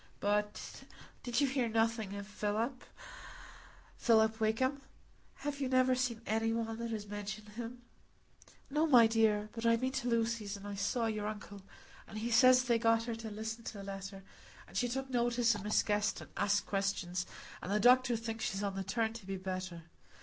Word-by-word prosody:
But 210 +1 -2 0.4
did 245 +2 0
you - - +5
hear 260 -3 0
nothing 225 -2 0
of 200 0 -5
Philip—Philip 220 - -2
Wakem? 260 +6 +1 0.5
Have 285 0 -4
you 265 - 0
never 255 0 +4
seen 250 -3 -1
any 225 +1 +1
one 225 0 -2
that 235 0 -3
has 215 -2 -4
mentioned 205 +1 -6
him?" 240 +3 -7 0.9
"No, 305 +3 +2
my 245 -6 +8
dear; 220 -2 +2
but 225 - -6
I've 230 0 +3
been 260 0 0
to 265 -2 -2
Lucy's, 225 -3 0
and 200 +1 -9
I 205 - -4
saw 215 +4 0
your 215 -2 -1
uncle, 205 -1 -7 0.5
and 215 - -8
he 230 +2 -2
says 255 +3 +7
they 235 -2 +2
got 230 0 +3
her 235 0 -3
to 225 0 -6
listen 220 +2 -5
to - - -5
the 200 - -7
letter, 195 0 -7 0.4
and - - -16
she 245 - +1
took 270 +2 -2
notice 240 -2 +2
o' 205 - -5
Miss 210 +1 +2
Guest, 210 0 0
and - - -11
asked 205 0 +1
questions, 190 -2 -1 0.3
and 185 - -5
the 210 - +2
doctor 250 +1 +5
thinks 225 0 -4
she's 195 +1 -2
on 200 -1 -1
the 195 - -2
turn 220 +3 0
to 225 -4 -10
be 195 0 -3
better. 185 -2 -5
225 Hz, 185 wpm, -34 LUFS, 205-240 Hz, 0.9 s, my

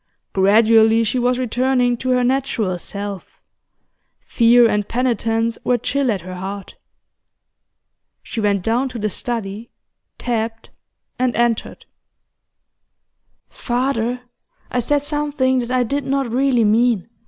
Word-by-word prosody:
Gradually 220 +3 +4
she 230 +3 0
was 245 0 +1
returning 250 0 +1
to 255 - -4
her 250 -1 +2
natural 245 -8 0
self; 200 0 -7 0.9
fear 235 0 +5
and 210 -2 -1
penitence 230 -2 -1
were 245 - +2
chill 275 +3 -1
at 195 -4 -2
her 185 +2 -8
heart. 190 +2 -7 1.5
She 225 - -5
went 200 -3 +1
down 240 +5 0
to 250 - -7
the 215 -1 -1
study, 225 0 -4 0.5
tapped, 225 -1 -3 0.5
and 255 -1 +1
entered. 235 -1 -1 1.6
'Father, 245 -1 -2 0.5
I 250 - 0
said 285 +4 0
something 290 -3 0
that 240 -1 -4
I 255 0 +2
did 280 +4 -2
not 270 -3 -1
really 255 -1 +2
mean. 220 -1 +2
235 Hz, 120 wpm, -19 LUFS, 220-255 Hz, 1.6 s, fear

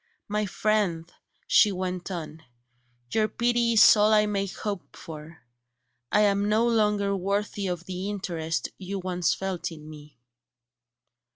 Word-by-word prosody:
"My 210 0 -1
friend," 190 -6 -1 0.3
she 210 - +5
went 185 -1 -4
on, 160 -3 -6 0.7
"your 215 -1 +2
pity 235 +1 +1
is 225 - +8
all 210 0 +4
I 210 -1 +5
may 200 -1 -1
hope 200 0 -6
for; 160 0 -11 0.7
I 210 - +4
am 200 0 +2
no 220 +3 +3
longer 210 -3 +1
worthy 200 +1 -2
of 175 -1 -4
the 185 +2 -4
interest 170 -5 -3
you 195 +1 -5
once 180 -2 0
felt 190 -3 -4
in 155 -2 -11
me." 150 -2 -13
195 Hz, 135 wpm, -26 LUFS, 175-210 Hz, 0.7 s, is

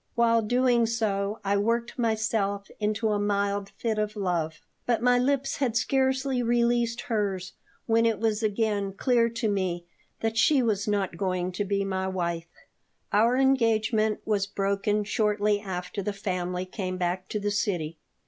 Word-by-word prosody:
While 230 -1 +4
doing 245 +1 +2
so 210 -2 -1
I 200 +1 +2
worked 230 +4 -1
myself 220 -3 0
into 215 +1 0
a 210 -1 +1
mild 200 -1 0
fit 220 -2 -1
of 210 0 -2
love, 175 -6 -1 0.3
but 235 -1 +1
my 245 0 +4
lips 275 +1 0
had 245 -5 0
scarcely 265 0 +1
released 235 0 +1
hers 200 -7 -2 0.3
when 230 0 +3
it 225 -2 +1
was 220 -1 0
again 210 -2 0
clear 235 +2 +2
to 230 0 -2
me 185 -4 -1 0.4
that 225 0 -1
she 270 +2 +4
was 210 -3 0
not 200 -4 -1
going 185 -1 -1
to 185 +3 -2
be 200 0 0
my 190 -1 -2
wife 170 -3 -2 0.6
Our 230 +5 +4
engagement 225 -5 +2
was 205 -2 +1
broken 200 +1 0
shortly 210 0 +1
after 190 0 -5
the 205 +1 -2
family 180 -2 -3
came 185 -1 -4
back 180 +1 -2
to 210 - -2
the 205 0 -1
city. 170 -6 -1
210 Hz, 160 wpm, -27 LUFS, 195-230 Hz, 0.6 s, While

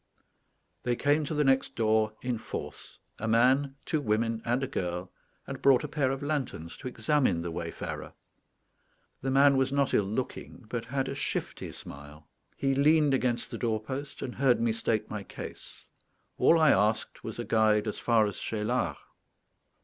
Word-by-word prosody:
They 120 -1 0
came 145 +4 +2
to 155 - -3
the 150 - +3
next 135 -1 +2
door 110 -1 +2
in 125 -3 -1
force, - - -7 0.2
a 110 - -3
man, 130 +5 +3
two 155 - 0
women, 115 -1 0
and 120 +3 0
a - - -1
girl, 90 -2 -3 0.3
and - - -7
brought 135 0 +5
a - - -2
pair 145 -3 0
of 135 +1 -3
lanterns 140 - -3
to - - -7
examine 125 - +1
the 85 - -4
wayfarer. 85 0 -5 1.1
The 135 - -2
man 140 +1 +5
was 135 0 +2
not 140 -1 +1
ill 100 - +3
looking, 120 +3 -5
but 120 -1 -3
had 135 +3 -1
a - - -3
shifty 140 - -3
smile. 75 +2 -10 0.3
He 135 0 +1
leaned 150 +1 +4
against 125 -2 0
the - - -5
doorpost, 120 +5 -3
and 125 - -4
heard 130 -2 +3
me 115 -1 +2
state 110 -1 -1
my 105 -1 -5
case. 100 - -10 0.5
All 165 - +5
I 155 -3 +6
asked 105 +3 +1
was - - -6
a - - -4
guide 110 -1 +3
as 105 - -3
far 115 -3 +3
as 100 - -4
Cheylard. 105 -7 -1
120 Hz, 170 wpm, -29 LUFS, 110-135 Hz, 1.1 s, I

